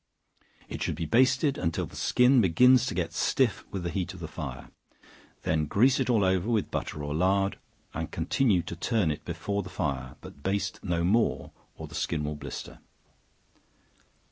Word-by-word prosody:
It - - -7
should - - -1
be 85 +1 -3
basted 130 - +3
until 85 -2 -1
the - - -13
skin 125 0 +4
begins 125 +8 +5
to - - -3
get 85 -2 -2
stiff 125 +5 +1
with 95 -3 -5
the 85 - -2
heat 95 +1 -3
of - - -10
the 80 - -5
fire; 75 -5 -7 0.7
then 80 -1 0
grease 125 - +3
it 130 - 0
all 115 -5 +3
over 95 +2 +1
with 110 -3 0
butter 75 - -4
or 75 0 -3
lard, 95 +4 +1 0.3
and - - -4
continue 105 -10 +1
to 85 - -6
turn 95 -1 +1
it 75 - -6
before 100 0 -2
the 95 - -8
fire, 65 -7 -3
but 70 - -12
baste 100 +5 -2
no 85 -3 0
more, 110 +7 +1 0.3
or - - -7
the - - -14
skin 80 -3 -2
will 75 +1 -2
blister. 75 -2 -8
95 Hz, 180 wpm, -28 LUFS, 80-115 Hz, 0.7 s, begins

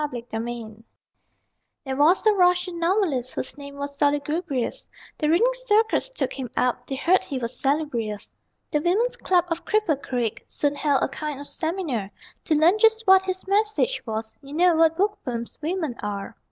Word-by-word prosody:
A 295 - -1
SYMPOSIUM 230 -2 -6 1.0
There 265 -1 -3
was 315 +10 +4
a 430 - +6
Russian 360 -2 +2
novelist 335 - 0
Whose - - -3
name 280 -1 -9
was 280 0 -5
Solugubrious, 290 -1 -1 0.3
The 300 - +1
reading 420 +10 +4
circles 480 -1 +1
took - - -2
him 260 -3 -5
up, 250 0 0
(They'd 270 - -3
heard 365 +7 +3
he 275 - -4
was 235 -1 -3
salubrious.) 255 -8 -1 0.4
The 300 - +1
women's 415 +10 +1
club 360 -2 +2
of 335 0 -2
Cripple 420 -10 +1
Creek 240 -6 -2
Soon 290 -1 0
held 285 -1 +1
a - - +2
kind 295 0 -5
of 285 - -7
seminar 315 - -2 0.4
To 310 - +2
learn 335 +7 +4
just 445 0 +4
what 380 0 +6
his 375 0 -3
message 430 +5 +1
was 220 0 -4
You 280 +1 -9
know 350 +1 +5
what 325 0 +4
bookworms 265 - -2
women 320 -3 -2
are. 205 +1 -5
300 Hz, 170 wpm, -24 LUFS, 255-370 Hz, 1.0 s, a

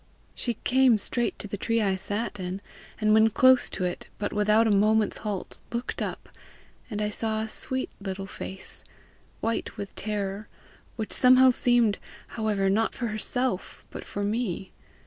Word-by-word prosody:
She 240 -2 -2
came 255 -3 +5
straight 240 +3 -1
to - - -6
the 205 - -4
tree 230 +3 0
I 195 -3 +2
sat 205 +2 -3
in, 185 +1 -4 0.4
and 215 -1 +3
when 220 +1 +6
close 255 +3 +5
to 185 - -4
it, 180 -1 -3
but 205 - -3
without 210 +2 +4
a 220 - +3
moment's 215 +2 +3
halt, 205 -4 -4
looked 235 +1 -3
up, - - -4 0.6
and 210 -2 -2
I 210 - -1
saw 220 0 -1
a 220 - -3
sweet 260 +4 -2
little 195 -1 -4
face, 190 0 -6 0.6
white 225 +1 -2
with 200 - -6
terror 205 0 -3 0.5
which 220 -2 -4
somehow 255 0 +7
seemed, 240 -4 +2 0.3
however, 210 -3 0
not 215 +4 +1
for 240 -2 -2
herself, 215 0 -2
but - - -7
for 205 - -4
me. 205 -3 -2
215 Hz, 165 wpm, -27 LUFS, 200-235 Hz, 0.6 s, somehow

